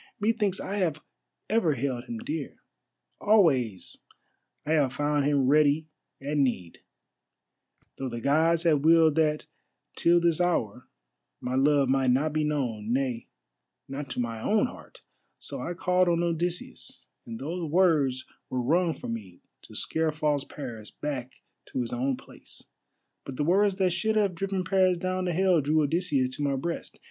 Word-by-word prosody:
Methinks 210 -3 0
I 200 - -4
have 160 -6 -1 0.4
ever 190 -9 +2
held 125 -1 -3
him 235 - -5
dear; 290 +8 -5 0.6
always 140 - +2 0.7
I 150 - -2
have 145 -5 +2
found 145 -1 0
him 140 -2 +2
ready 150 +2 +3 0.3
at 145 +2 -3
need, 120 -12 -1 1.2
though 135 - -3
the 120 -1 -5
Gods 160 +6 +2
have 160 -4 +3
willed 160 -1 +5
that 150 -1 +1 0.5
till 170 +1 +4
this 170 0 +2
hour 125 - -1 0.5
my 125 - -4
love 140 +1 +3
might 135 0 +2
not 145 +5 +2
be 155 0 +1
known, 120 -8 -2
nay, 125 -2 -1 0.6
not 140 +1 -6
to 125 - -4
my 115 -2 -3
own 210 - +2
heart; - - -11 0.3
so - - -5
I 175 - -4
called 180 +1 +2
on 170 0 +1
Odysseus, 170 +1 -3 0.2
and 115 -1 -6
those 165 +4 -4
words 150 -7 +2 0.2
were 130 - -2
wrung 165 +5 +2
from 115 - -6
me 95 -6 -9 0.2
to - - -14
scare 160 0 0
false 150 -2 0
Paris 120 -8 -8
back 130 -4 -5 0.3
to - - -4
his 120 - -4
own 130 +2 -1
place. - - -14 0.6
But 135 - -7
the 145 - -1
words 195 +5 +3
that 185 -2 +1
should 215 +6 0
have 205 -3 +2
driven 195 +1 -2
Paris 185 -1 +2
down 185 +1 -2
to 180 - 0
Hell 180 -1 +3
drew 155 +2 +2
Odysseus 145 -5 0
to - - -5
my 140 -1 +1
breast. 170 +6 -4
150 Hz, 160 wpm, -27 LUFS, 135-175 Hz, 1.2 s, willed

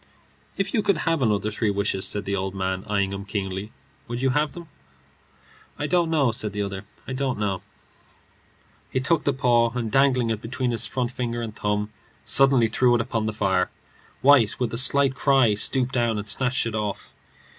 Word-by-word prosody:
"If 195 - -1
you 220 - +2
could 200 -4 +1
have 165 -3 +1
another 105 -3 +1
three 105 0 0
wishes," 100 -1 0
said 105 -1 0
the 100 - -1
old 95 0 -3
man, 95 0 -2
eyeing 100 -2 0
him 100 0 -5
keenly, 100 0 -4 0.4
"would 120 +1 -4
you 130 0 +1
have 150 +1 0
them?" 170 -1 -10 1.1
"I 145 - -2
don't 170 +1 +2
know," 145 -7 +2
said 110 -2 -3
the 105 - -2
other. 100 0 -5 0.2
"I 130 - -4
don't 130 -1 -1
know." 100 -3 -2 1.3
He - - -1
took 155 +5 +1
the 140 - +3
paw, 120 -3 +3
and 115 -3 -2
dangling 130 -4 +3
it 110 -1 -3
between 125 +2 -2
his 115 -1 +1
forefinger 120 -2 -3
and 110 -2 -6
thumb, 105 0 -1 0.3
suddenly 135 -4 +4
threw 120 +2 +3
it 120 - +2
upon 110 -1 -2
the - - 0
fire. 95 -3 +1 0.5
White, 130 -5 +5
with 125 -3 -1
a - - -2
slight 135 +1 +3
cry, 135 -5 +3
stooped 125 +5 0
down 120 -3 +1
and 105 +1 -5
snatched 125 +4 0
it 115 - -3
off. 105 -2 -4
115 Hz, 190 wpm, -24 LUFS, 105-130 Hz, 1.3 s, White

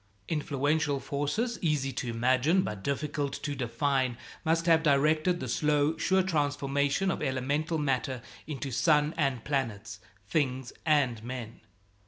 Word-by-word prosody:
Influential 145 -1 0
forces, 145 - -2
easy 150 -5 +1
to 130 -2 -4
imagine, 130 +10 +2
but 105 -2 -4
difficult 145 0 -2
to 145 - -3
define, 130 0 0 0.3
must 165 +1 +1
have 165 -2 +5
directed 155 +4 +3
the - - -4
slow, 150 +1 +2
sure 190 0 +2
transformation 145 +1 0
of - - -4
elemental 145 +4 -1
matter 130 -4 -1 0.2
into 140 -3 -4
sun 150 +3 +3
and 135 -7 0
planets, 115 -6 -2 0.3
things 130 -1 -1
and 130 -8 +2
men. 120 -2 -7
145 Hz, 130 wpm, -29 LUFS, 130-155 Hz, 0.3 s, have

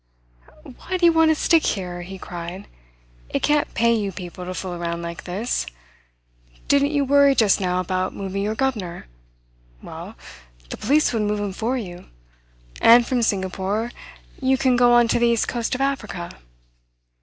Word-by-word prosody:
"Why 345 +8 -5
do 355 - +2
you 335 - +6
want 325 0 +4
to 315 - +4
stick 325 +1 +3
here?" 180 -3 -2
he 190 +2 -8
cried. 175 +2 -7 0.6
"It - - -2
can't 295 0 +2
pay 235 0 +3
you 205 -3 -1
people 180 0 -8
to 185 +1 -5
fool 185 -1 -4
around 170 0 -4
like 170 0 -7
this. 190 - -2 1.0
Didn't 280 0 +3
you 290 -2 0
worry 280 0 +5
just 210 -5 +3
now 180 -1 0
about 185 +1 -2
moving 195 0 -4
your 210 +2 -1
governor? 220 -10 -2 0.7
Well, - - -9 0.6
the - - -5
police 290 +4 +2
would 225 - 0
move 210 0 -1
him 205 -2 -3
for 235 +6 -1
you; 180 -6 -7 0.8
and 235 +1 +7
from 250 -1 0
Singapore 200 +2 -1 0.5
you 265 0 +2
can 260 -1 +2
go 245 0 +5
on 240 -1 +5
to 230 - +1
the 235 - +3
east 235 -1 +1
coast 235 0 -2
of 260 - -4
Africa." 215 -11 -3
220 Hz, 170 wpm, -22 LUFS, 185-260 Hz, 1.0 s, and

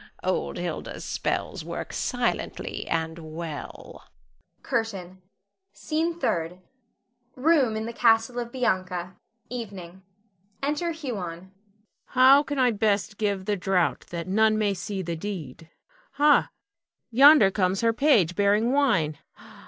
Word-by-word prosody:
old 70 -1 -1
Hilda's - - -5
spells - - -3
work - - -6
silently - - -2
and 160 0 -2
well. 160 -1 -8 0.5
CURTAIN. 195 -7 -3 0.5
SCENE 330 +2 -2
THIRD. 175 - -1 0.8
[Room 265 -5 +2
in 220 - -3
the 235 - -5
castle 230 +1 +3
of 235 -1 -5
Bianca. 185 -7 -2 0.3
Evening. 195 -7 -8 0.6
Enter 300 +4 -1
Huon.] 270 - -5
Huon. 175 +2 -8 0.5
How 260 +2 +6
can 290 0 -5
I 255 -2 +4
best 210 -1 0
give 200 -3 -1
the 210 - 0
draught 185 -2 0
that 170 0 -5
none 215 +3 +3
may 210 -2 +1
see 195 0 -5
the 170 -1 -3
deed? 165 -5 -7 0.4
Ha! 295 0 +4 0.6
yonder 265 -4 +7
comes 190 -1 0
her 230 -1 +2
page, 225 - +3
bearing 205 +4 +2
wine. 220 - +1
210 Hz, 120 wpm, -25 LUFS, 180-250 Hz, 0.8 s, yonder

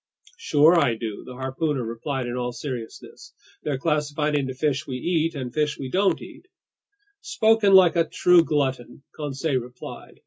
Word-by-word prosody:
"Sure 160 - +4
I 125 -7 +2
do," 110 -2 -6
the 125 - -9
harpooner 135 +1 -2
replied 125 +3 -4
in 120 0 -4
all 125 0 -2
seriousness. 125 -4 -8 0.3
"They're 145 -3 -2
classified 150 0 -1
into 135 -2 -1
fish 140 +1 -1
we 130 - -4
eat 165 +2 0
and 130 -3 -5
fish 150 0 0
we 130 - -6
don't 195 +1 +2
eat!" - - -13 0.7
"Spoken 220 -3 +3
like 180 -3 +6
a 165 -1 +3
true 180 0 +5
glutton," 135 -5 -2
Conseil 145 -1 -2
replied. 125 0 -10
145 Hz, 160 wpm, -24 LUFS, 130-160 Hz, 0.7 s, like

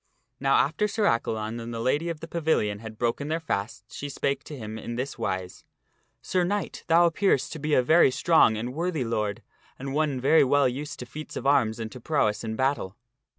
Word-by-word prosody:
Now 135 0 +3
after 160 +9 +2
Sir 210 +1 -2
Accalon 115 - 0
and 115 0 -6
the 115 - -4
Lady 145 +8 0
of 165 -2 -5
the 165 - -7
Pavilion 155 -12 0
had 110 0 -9
broken 120 +5 -1
their 160 +2 -1
fasts 110 -6 -4
she 145 - -5
spake 140 0 -2
to 150 - -8
him 110 -2 -6
in 120 - -5
this 130 +3 -4
wise, 95 -1 -3 0.3
" - - -44
Sir 180 -1 +1
knight, 200 +3 -2
thou 170 +1 +5
appearest 170 -4 +1
to 160 - -7
be 150 +1 +1
a 130 - +4
very 160 +3 +6
strong 130 -5 +4
and 120 +3 -4
worthy 165 -2 -1
lord 105 -4 -2 0.3
and 135 +1 -5
one 150 -3 0
very 140 +5 +5
well 140 +1 +3
used 140 +4 -4
to - - -5
feats 150 +5 -9
of - - -5
arms 120 -6 +3
and 110 -1 -5
to 125 - -10
prowess 115 -8 0
in 110 -1 -3
battle." 130 -6 -1
135 Hz, 215 wpm, -26 LUFS, 115-155 Hz, 0.3 s, very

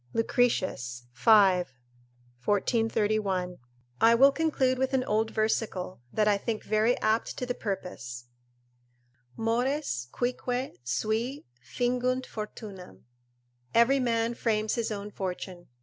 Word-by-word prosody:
Lucretius, 185 - 0
v. 120 - -1
1431] 180 - +1 0.4
I 230 +1 +7
will 275 +4 +7
conclude 270 -5 +1
with 265 +1 +1
an 255 - +2
old 220 -1 +1
versicle, 215 - -1
that 215 -1 +2
I 205 -1 +3
think 220 0 -3
very 215 +3 +2
apt 220 +1 0
to 250 - -2
the 245 - -2
purpose: 180 - -5 1.1
"Mores 230 - 0
cuique 250 -2 -2
sui 220 - -2 0.2
fingunt 250 - 0
fortunam." 210 -3 -8 0.7
["Every 250 +4 +5
man 230 -2 +1
frames 220 -2 0
his 235 -2 -1
own 205 -1 -5
fortune." 180 -2 -5
215 Hz, 110 wpm, -28 LUFS, 185-245 Hz, 1.1 s, I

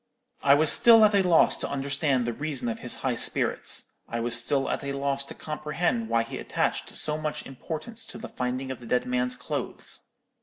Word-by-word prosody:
"I 140 0 +5
was 155 +1 +4
still 225 -2 +8
at 210 - +2
a 200 - +4
loss 180 -3 +4
to - - -3
understand 140 -2 0
the 120 - -2
reason 140 -2 -4
of 115 - -4
his - - 0
high - - +1
spirits; - - +1
I 115 - -3
was 120 +1 +2
still 135 +3 +2
at - - -3
a 140 0 -3
loss 140 0 -1
to - - -10
comprehend 165 +9 -2
why 115 - +2
he 115 - -7
attached - - -2
so 150 0 +1
much 155 -1 -4
importance 160 - -4
to - - -9
the - - -8
finding 130 +1 -4
of 130 - -7
the 120 - -12
dead 125 +2 0
man's 125 0 -1
clothes. 125 - -4
140 Hz, 205 wpm, -26 LUFS, 125-155 Hz, -, still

